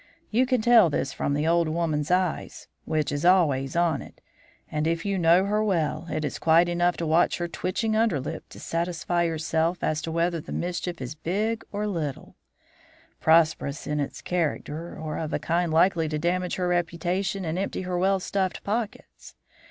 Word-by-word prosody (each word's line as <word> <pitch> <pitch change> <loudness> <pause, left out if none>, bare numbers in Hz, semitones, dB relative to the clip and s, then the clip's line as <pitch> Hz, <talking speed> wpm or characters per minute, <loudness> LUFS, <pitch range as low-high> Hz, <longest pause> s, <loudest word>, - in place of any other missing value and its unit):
You 250 +4 +3
can 255 -4 +1
tell 230 -7 +6
this 140 -2 -2
from 140 - -1
the 150 +1 0
old 170 0 +3
woman's 155 -2 -1
eye, 180 -2 +1 0.4
which 155 -2 0
is 145 +2 -2
always 155 -7 +3
on 170 -5 +2
it; - - -13 0.5
and, 150 +1 -1
if 165 +2 -1
you 200 -1 0
know 170 +3 +5
her 210 +1 +1
well, 165 -5 0
it 155 -1 -2
is 145 - -4
quite 165 +2 +4
enough 175 0 +1
to 170 - -2
watch 160 +2 +3
her 175 - -2
twitching 215 +6 -2
underlip 165 - -1
to - - -12
satisfy 170 0 -1
yourself 165 +1 -1
as 155 0 0
to 165 - -4
whether 170 0 0
the - - -10
mischief 175 -1 -3
is 130 +2 -4
big 205 +9 -2
or 210 +1 -2
little; 160 -9 -4 0.8
prosperous 160 -3 +2
in 150 0 -1
its 140 - -4
character, 165 -1 -2
or 155 -1 -4
of 160 -1 -4
a - - +2
kind 170 0 0
likely 165 -1 +3
to 155 - -2
damage 180 +3 -1
her 180 -1 -1
reputation 175 +2 -1
and 165 +3 -2
empty 195 -1 -3
her 180 0 -3
well 195 +1 +2
stuffed 190 -1 -2
pockets. 215 +1 -5
170 Hz, 185 wpm, -26 LUFS, 155-185 Hz, 0.8 s, tell